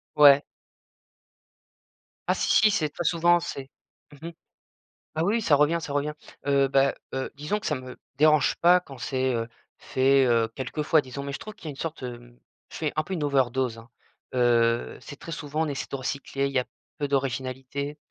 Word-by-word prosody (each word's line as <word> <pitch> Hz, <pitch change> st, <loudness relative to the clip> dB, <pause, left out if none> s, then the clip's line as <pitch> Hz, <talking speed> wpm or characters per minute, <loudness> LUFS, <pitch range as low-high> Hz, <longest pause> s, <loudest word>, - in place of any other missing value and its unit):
Ouais! 145 Hz, -1 st, +8 dB, 1.9 s
Ah -, -, +5 dB
si, -, -, -1 dB
si, 215 Hz, -1 st, +5 dB
c'est 155 Hz, -5 st, 0 dB
très 175 Hz, +3 st, -5 dB
souvent! 175 Hz, +1 st, +4 dB
C'est 135 Hz, -4 st, -6 dB, 0.5 s
mmh 165 Hz, -, -6 dB
mh. -, -, -6 dB, 0.8 s
Ah 160 Hz, +2 st, +1 dB
oui, 225 Hz, +3 st, +1 dB
ça 150 Hz, -7 st, +4 dB
revient, 150 Hz, +4 st, +3 dB
ça 150 Hz, -, -6 dB
revient. 145 Hz, +1 st, -1 dB, 0.3 s
Heu, 140 Hz, -1 st, +3 dB
bah, 135 Hz, 0 st, +3 dB, 0.2 s
heu, 130 Hz, 0 st, -2 dB
disons 150 Hz, +9 st, -2 dB
que -, -, -11 dB
ça 150 Hz, -, +1 dB
me 130 Hz, 0 st, -8 dB, 0.2 s
dérange 155 Hz, -1 st, +4 dB
pas 180 Hz, +1 st, +6 dB
quand 140 Hz, -7 st, -12 dB
c'est, 130 Hz, +1 st, -1 dB
heu, 115 Hz, 0 st, -2 dB, 0.3 s
fait, 135 Hz, +1 st, +3 dB
heu, 115 Hz, -2 st, +3 dB
quelquefois, 150 Hz, +4 st, +1 dB
disons. 130 Hz, +2 st, -7 dB
Mais 140 Hz, 0 st, -5 dB
je -, -, -3 dB
trouve 215 Hz, -, -8 dB
qu'il 205 Hz, -5 st, -17 dB
y -, -, -4 dB
a -, -, -3 dB
une -, -, -10 dB
sorte, 160 Hz, -2 st, -5 dB
hem 120 Hz, -1 st, -9 dB, 0.3 s
je -, -, -7 dB
fais 155 Hz, -2 st, -2 dB
un 155 Hz, -, +1 dB
peu 190 Hz, -, -6 dB
une 160 Hz, -4 st, -2 dB
overdose, 130 Hz, -3 st, +1 dB
hein. 115 Hz, +1 st, -14 dB, 0.4 s
Heu, 120 Hz, -1 st, +2 dB
c'est 145 Hz, -, -10 dB
très 165 Hz, -, -7 dB
souvent, 155 Hz, 0 st, -2 dB
on -, -, -1 dB
essaie 140 Hz, -2 st, -4 dB
de -, -, -2 dB
recycler, 140 Hz, +1 st, -3 dB
il 140 Hz, -, -3 dB
y 130 Hz, -, +3 dB
a 125 Hz, -, -2 dB, 0.3 s
peu 145 Hz, -2 st, -2 dB
d'originalité. 135 Hz, +2 st, -2 dB
140 Hz, 200 wpm, -26 LUFS, 130-155 Hz, 1.9 s, Ouais